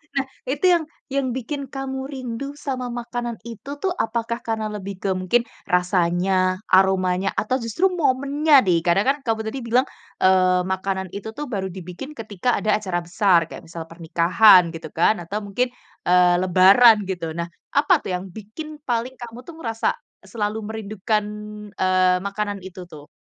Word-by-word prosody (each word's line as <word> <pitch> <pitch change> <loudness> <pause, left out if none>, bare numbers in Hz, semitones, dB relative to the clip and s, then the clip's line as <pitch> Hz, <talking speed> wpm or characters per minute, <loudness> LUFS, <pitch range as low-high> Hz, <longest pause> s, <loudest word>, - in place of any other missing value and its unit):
Nah 275 - +1 0.2
itu 290 +7 0
yang 335 - +2 0.3
yang 275 -1 +1
bikin 280 +4 -4
kamu 265 0 -4
rindu 255 0 -5 0.2
sama 255 -2 -2
makanan 240 -1 -4
itu 235 +3 -9
tuh, 375 -2 0
apakah 230 +1 -2
karena 220 -1 -1
lebih 200 -1 -6
ke 195 - -1
mungkin 235 +6 +2 0.3
rasanya, 180 +1 +2 0.4
aromanya, 190 0 +3
atau 235 +4 0
justru 230 - 0 0.2
momennya 280 +3 +1
nih? 175 -2 +3
Kadang 175 +4 +3
kan 285 - +2
kamu 225 -2 0
tadi 265 +5 -4
bilang, 250 +3 +3 0.4
eee, 185 -1 +4
makanan 190 0 -3
itu 200 +2 -6
tuh 295 - -3
baru 190 -1 -1
dibikin 180 - -8
ketika 215 +1 -3
ada 215 - -2
acara 185 -5 -2
besar 185 -1 +4
kayak - - -9
misal 165 -1 -6
pernikahan 170 +4 +5
gitu 165 - -8
kan, 170 +6 +3
atau 195 +5 -4
mungkin, 245 +6 0 0.4
eee, 180 0 +5
lebaran 190 +6 +7
gitu. 175 -3 -3
Nah 170 - -1 0.3
apa 340 +6 +5
tuh - - -7
yang 180 - -5
bikin 220 +10 -8 0.2
paling 240 +2 -1
kamu 235 0 -8
tuh 340 - -10
merasa 225 -7 -2 0.4
selalu 215 -1 -3
merindukan, 215 -1 -2 0.6
eee, 185 -1 +3
makanan 205 0 -2
itu 185 0 -9
tuh? 150 -3 -12
210 Hz, 160 wpm, -22 LUFS, 185-245 Hz, 0.6 s, lebaran